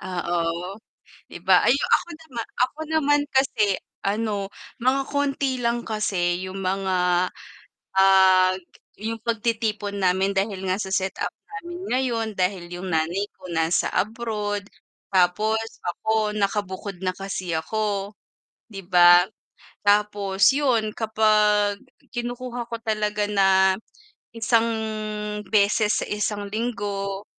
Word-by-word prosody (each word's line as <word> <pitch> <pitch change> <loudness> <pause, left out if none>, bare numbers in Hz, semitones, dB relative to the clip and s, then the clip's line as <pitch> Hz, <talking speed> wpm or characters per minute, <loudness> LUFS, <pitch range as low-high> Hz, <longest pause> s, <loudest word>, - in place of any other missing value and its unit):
Oo 175 +1 -2 0.5
'di - - -9
ba. - - +6
Ay 245 - +5
ako - - +2
nama 265 -8 -6 0.2
ako 300 - -18
naman 290 -2 +3
kasi 220 -7 +2 0.3
ano, 205 -1 -1 0.3
mga 265 +2 +3
konti 275 -3 -1
lang 235 0 0
kasi 185 -5 0
yung 190 +1 -6
mga, 185 -1 +1 0.7
ah, 190 -1 +6 0.5
yung 225 +2 -4
pagtitipon 220 -3 -1
namin 190 +2 +2
dahil 195 0 -1
nga 185 - +2
sa 190 - -5
set-up 190 0 -1 0.2
namin 355 -4 -8
ngayon 245 -3 0
dahil 180 -1 -1
yung 180 +1 -5
nanay 165 +5 0
ko - - -11
nasa 165 +1 +1
abroad, 210 -2 -2 0.5
tapos 190 +4 +3 0.3
ako 215 +3 0
nakabukod 200 -2 -2
na 185 - +1
kasi 195 -2 -4
ako, 200 +4 -2 0.6
'di 195 -2 -7
ba? 175 -1 +7 0.6
Tapos 205 -1 +3
yun 240 -7 +1
kapag 210 -2 +3 0.4
kinukuha 245 0 -4
ko 230 - -2
talaga 210 -2 0
na 190 -1 +4 0.6
isang 230 0 +3 0.9
beses 210 0 +3
sa - - -9
isang 210 0 -2
linggo, 205 -3 -3
205 Hz, 115 wpm, -24 LUFS, 190-225 Hz, 0.9 s, ba